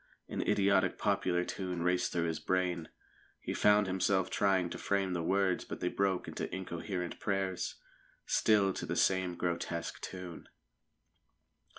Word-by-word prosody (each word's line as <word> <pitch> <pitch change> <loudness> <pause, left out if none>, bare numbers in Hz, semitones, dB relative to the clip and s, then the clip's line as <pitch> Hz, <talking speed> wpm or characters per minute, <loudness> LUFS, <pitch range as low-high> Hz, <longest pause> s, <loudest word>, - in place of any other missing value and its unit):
An - - -3
idiotic 100 0 +3
popular 95 -3 +1
tune 90 -3 -3
raced 90 0 +1
through 85 - 0
his 80 -1 -1
brain. 90 -3 0 0.5
He - - -4
found 105 0 +4
himself 95 0 +1
trying 95 -3 +2
to - - -5
frame 95 -2 0
the 85 - -1
words, 95 +1 +1
but - - -7
they 90 - 0
broke 95 -1 0
into - - -4
incoherent 90 -1 -4
prayers, 95 -2 -1 0.5
still 100 -3 +3
to - - -5
the - - -1
same 95 -2 +2
grotesque 85 -1 -3
tune. 90 -2 -7
95 Hz, 145 wpm, -33 LUFS, 90-95 Hz, 0.5 s, found